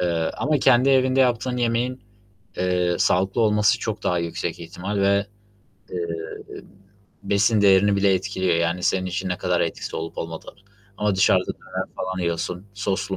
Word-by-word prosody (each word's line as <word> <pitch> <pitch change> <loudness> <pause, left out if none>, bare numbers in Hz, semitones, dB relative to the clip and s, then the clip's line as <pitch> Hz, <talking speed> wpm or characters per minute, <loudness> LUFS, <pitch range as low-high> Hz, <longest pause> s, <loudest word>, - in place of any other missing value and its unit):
Eee, 85 -2 0
ama 150 +2 +1
kendi 130 0 +4
evinde 130 0 +3
yaptığın, 125 0 +1
eee, 125 - -1
yemeğin 120 +2 0 1.0
sağlıklı 95 +5 +2
olması 105 -1 +3
çok - - -4
daha 90 - +1
yüksek 85 0 -4
ihtimal 95 +4 -4
ve, 100 +1 +2 0.6
eee, 90 - -4 1.2
besin 100 +2 +2
değerini 100 0 +5
bile 100 -1 +3
etkiliyor, 95 -1 -1
yani, 85 +2 0
senin 95 +1 +1
için 95 +1 -3
ne 90 - -2
kadar - - 0
etkisi - - -3
olup 80 0 -6
olmadığının 80 +4 -7 0.4
ama 105 -1 0
dışarıda 95 - +3
döner - - -7
falan 95 0 -3
yiyorsun 85 +3 -3
soslu 95 -1 -2
100 Hz, 150 wpm, -23 LUFS, 90-110 Hz, 1.2 s, değerini